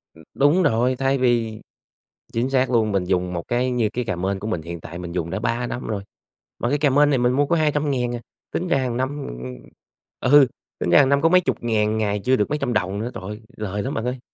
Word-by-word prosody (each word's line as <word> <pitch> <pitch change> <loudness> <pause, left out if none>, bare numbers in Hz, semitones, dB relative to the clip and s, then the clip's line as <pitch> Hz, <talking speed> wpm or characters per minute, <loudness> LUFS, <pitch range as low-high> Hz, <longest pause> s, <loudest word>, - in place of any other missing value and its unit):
Ừm. 80 - -15
Đúng 150 +6 +3
rồi, 125 -1 +2
thay 135 +1 +1
vì 115 -4 +1 0.7
chính 120 +3 0
xác 130 -1 +2
luôn, 110 -3 +2
mình 95 -2 +1
dùng 90 -1 0
một 85 -1 -5
cái 125 +1 0
như 115 -4 +1
cái 125 +2 -3
cà 95 - -2
mên 95 +2 -2
của 105 - -5
mình 90 -7 -2
hiện 85 0 -7
tại 85 - -8
mình 90 -1 -6
dùng 85 -1 -2
đã 95 +3 -3
3 120 +2 -1
năm 125 - -5
rồi, 100 -3 -3 0.6
mà 120 - 0
cái 145 - +2
cà 145 0 +3
mên 145 +2 +4
này 135 - +2
mình 125 0 +3
mua 145 +2 +3
có 170 - +1
200.000 145 -6 0
à, - - -4 0.3
tính 180 - -2
ra 140 - +2
hàng 125 -3 -1
năm, 130 +1 0 0.2
ừm, - - -7
ừm, 65 0 -7 0.8
ừ, 145 -2 +8 0.3
tính - - -1
ra 85 - +6
hàng 135 - +5
năm 140 0 +3
có 165 - +4
mấy 185 +1 +5
chục - - -1
ngàn 110 -2 +1
ngày, 105 -1 0
chưa 130 +1 +3
được 105 -5 0
mấy 150 - 0
trăm 130 -4 -1
đồng 100 -1 -1
nữa, 115 +3 -3
trời - - -7
ơi, 105 +3 -7 0.2
lời 105 -1 -3
lắm 140 - -3
bạn 110 - -3
ơi. 125 +1 -2
120 Hz, 270 wpm, -22 LUFS, 100-135 Hz, 0.8 s, ừ